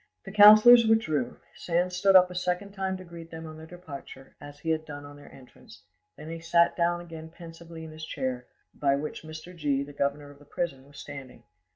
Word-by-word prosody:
The - - -8
councillors 215 +3 +8
withdrew; 155 - +1 0.2
Sand 180 +1 -1
stood 195 +2 +3
up 180 -1 +7
a - - -7
second 180 +2 -2
time 190 -1 -3
to 185 - -10
greet 170 -2 -11
them 160 0 -9
on 155 0 -9
their 160 0 -11
departure, 145 -6 -11
as 145 0 -11
he 160 +2 -3
had 155 0 -1
done 145 -2 -9
on 145 0 -12
their 145 - -15
entrance; 125 -5 -17 0.3
then 150 - -10
he 165 - -6
sat 170 +1 +2
down 175 0 0
again 165 -2 -10
pensively 165 -1 -11
in 160 - -9
his 155 0 -11
chair, 130 -5 -4 0.3
by 140 -1 +1
which 150 +2 -5
Mr. 155 +3 -10
G, 145 -4 -1
the 145 +1 -11
governor 145 +1 -2
of 140 - -18
the 145 - -18
prison, 140 -4 -4
was 145 - -17
standing. 135 -5 -10
160 Hz, 215 wpm, -27 LUFS, 145-180 Hz, 0.3 s, councillors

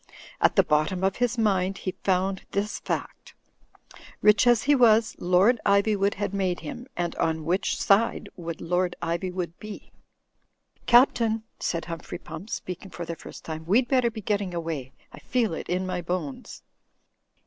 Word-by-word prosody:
At - - +4
the - - +6
bottom 155 +5 +1
of 195 0 +1
his 245 0 0
mind 195 -3 +1
he 185 - -3
found 190 0 +1
this 205 +1 -1
fact: - - -5 0.8
rich 210 +2 +5
as 240 -2 +5
he 290 - +4
was, 225 -4 +4
Lord 185 +7 +4
Ivywood 200 0 +2
had 205 -1 -3
made 185 -3 -1
him 250 -3 -7
— - - -40
^and 175 -1 -1
on 160 -1 0
which 185 +4 0
side 210 +4 +2
would 170 -2 -6
Lord 180 +1 0
Ivywood 175 +1 -2
be? 215 -1 -9 1.0
"Captain," 235 -3 +4 0.2
said 170 -1 -2
Humphrey 165 0 -6
Pump, 170 +4 -9
speaking 185 0 -6
for 170 0 -6
the 170 - -5
first - - -11
time, 160 0 -5
"we'd 240 +7 +3
better 255 -2 +3
be 220 -1 -8
getting 200 -3 -1
away. 160 -6 -4 0.2
I - - -10
feel 235 -8 0
it - - -6
in 180 +1 0
my 180 -1 -2
bones." 170 -5 -5
190 Hz, 165 wpm, -26 LUFS, 175-215 Hz, 1.0 s, the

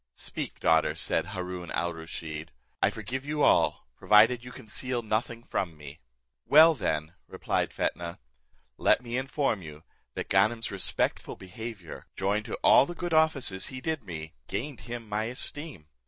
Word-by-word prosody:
"Speak, - - -4
daughter," 80 -1 +3
said - - 0
Haroon 90 -1 -5
al 85 0 -1
Rusheed, 80 -1 -7 0.3
"I - - +5
forgive 130 +2 -5
you 150 0 -1
all, - - +3
provided 115 +3 +5
you 125 - -9
conceal 120 +2 -3
nothing 115 +2 -2
from 85 -9 -3
me." 75 +1 -11 0.5
"Well, 160 +3 +8
then," 80 - -2
replied - - -1
Fetnah, 85 0 -2 0.6
"let - - +4
me 120 0 -4
inform 135 -4 0
you, 75 -1 -10 0.3
that - - -4
Ganem's 110 +4 +2
respectful 100 -1 -2
behaviour, 95 -1 -8
joined 100 +3 0
to - - -3
all 140 - +7
the 175 - -6
good 175 -1 -3
offices 140 -12 +3
he 130 - -6
did 155 -1 -2
me, 80 -4 -7
gained 140 +1 -4
him 120 -1 -7
my 105 +1 -1
esteem. 125 - -4
110 Hz, 155 wpm, -28 LUFS, 85-130 Hz, 0.6 s, Well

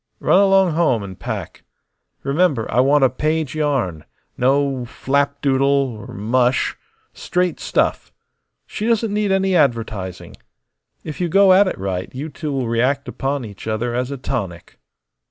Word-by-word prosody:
Run 185 - +4
along 195 -2 +4
home 155 -9 +1
and 95 -2 -9
pack. - - -6 0.6
Remember, 140 -4 +1
I - - +2
want 140 +2 +4
a 130 - +5
page 155 +1 -1
yarn. 135 - -1 0.3
No 135 0 +1
flapdoodle 140 +1 0
or 135 -6 0
mush; 125 +5 +1 0.4
straight 180 -1 -1
stuff. - - -1 0.5
She 215 - -4
doesn't 225 -2 +1
need 210 -1 0
any 190 -1 +2
advertising. 115 - -1 0.7
If 155 +3 -6
you 175 - 0
go 195 +2 +6
at 195 +1 +5
it - - -3
right 95 -1 -3
you 145 +5 -5
two 150 +1 -5
will 135 -3 -1
react 130 +5 0
upon 135 -2 -3
each 105 0 -10
other 115 +2 -1
as 125 +1 -1
a 140 - -5
tonic." 100 -10 -5
140 Hz, 150 wpm, -20 LUFS, 120-160 Hz, 0.7 s, go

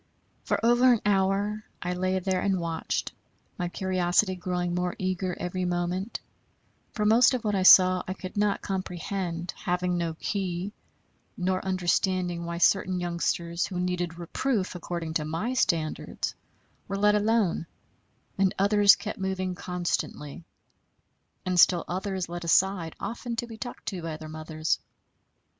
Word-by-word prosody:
For - - +1
over 240 +2 +6
an 235 - +3
hour 200 +1 +1 0.2
I 180 - -2
lay 185 +1 0
there 185 0 0
and 195 -2 +1
watched, 165 -1 -2 0.5
my 175 -1 -1
curiosity 185 +1 +1
growing 180 -1 -2
more 180 0 -1
eager 185 -1 -2
every 180 +1 -2
moment; 180 +4 -2 0.7
for 210 - -2
most 235 +4 +6
of 245 - -4
what 210 -1 0
I 195 - +1
saw 185 -1 +8
I 185 - -3
could 185 -1 -8
not 205 0 +1
comprehend, 180 -2 -3
having 180 -2 -1
no 165 -2 -2
key, 185 +2 -3 0.6
nor 185 0 0
understanding 180 -1 0
why 170 0 -4
certain 185 +1 +3
youngsters, 170 0 -1
who 180 -2 -4
needed 180 -2 -2
reproof 195 +4 -1
according 170 -2 -4
to 160 - 0
my 165 +11 -2
standards, 165 -10 -1 0.5
were 195 - -3
let 210 +1 +4
alone, 210 -5 +1 0.7
and 195 -1 +3
others 200 0 +6
kept - - -6
moving 190 -1 -2
constantly, 175 -4 -3 1.0
and 185 -1 +1
still 175 0 +5
others 190 0 -3
led 175 +1 -6
aside 175 -1 +2
often 235 +3 -4
to 235 - -2
be 230 -1 -9
talked 245 +3 -7
to 185 -4 -5
by 160 -2 -4
their 155 0 -9
mothers. 155 0 -2
185 Hz, 145 wpm, -27 LUFS, 175-195 Hz, 1.0 s, saw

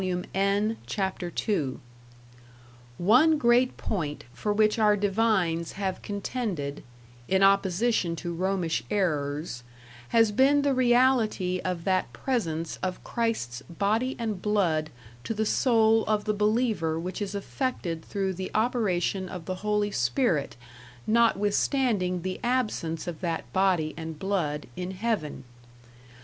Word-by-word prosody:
N, 200 +3 +1
Chap 190 -2 -2
II) 175 - -1 1.2
"One 250 - +5
great 245 -1 +3
point 155 -8 -3
for 210 - -2
which 215 +1 +2
our 210 -1 +4
divines 195 -5 +1
have 190 -2 -3
contended, 200 - -4 0.4
in 190 +1 +3
opposition 195 -1 +2
to 170 0 -5
Romish 175 -7 -1
errors, 150 - -1 0.5
has 225 - +4
been 275 +6 +4
the 285 -1 +2
reality 240 -7 +2
of 180 -2 -2
that 185 0 0
presence 165 -11 -2
of 185 -1 -3
Christ's 220 - -2
Body 210 - -1
and 220 -5 -3
Blood 175 -8 +1 0.3
to 225 - -3
the 220 +1 0
soul 225 -1 +3
of 210 -1 +1
the 215 - +1
believer 210 -6 +1
which 180 +5 -5
is 200 0 -3
affected 200 - -3
through 195 -2 -2
the 185 +1 -5
operation 200 -5 0
of 175 -3 -7
the 185 - -2
Holy 210 0 0
Spirit 155 - 0 0.5
notwithstanding 210 - +2
the 185 0 -3
absence 215 -10 -1
of 170 -3 -6
that 170 -3 -3
Body 185 -5 +2
and 160 -1 -6
Blood 165 -6 -1
in 180 0 -4
Heaven. 190 - -2
195 Hz, 125 wpm, -27 LUFS, 170-225 Hz, 1.2 s, One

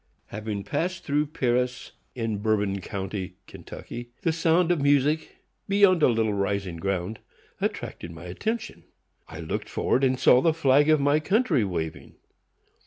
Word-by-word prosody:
Having 105 -1 -4
passed 175 - -2
through 145 +1 0
Paris, 125 -3 -1 0.2
in 115 -4 -2
Bourbon 105 -2 0
county, 95 0 -5
Ky., 120 0 -9
the 165 - +2
sound 165 +2 +2
of 170 -5 +1
music 145 +2 +2 0.3
(beyond 195 -3 +5
a - - +6
little 110 -3 +1
rising 100 -3 -2
ground) 95 +3 -2 0.4
attracted 85 - -3
my 85 -1 -10
attention. 215 - -4 0.5
I 80 +1 -8
looked 80 - -4
forward, 130 - 0
and 130 -1 +2
saw 125 - +6
the 160 0 +2
flag 145 -1 +4
of 155 -1 +5
my 145 +2 +3
country 195 - +2
waving. 85 -5 -4
125 Hz, 145 wpm, -26 LUFS, 100-155 Hz, 0.5 s, a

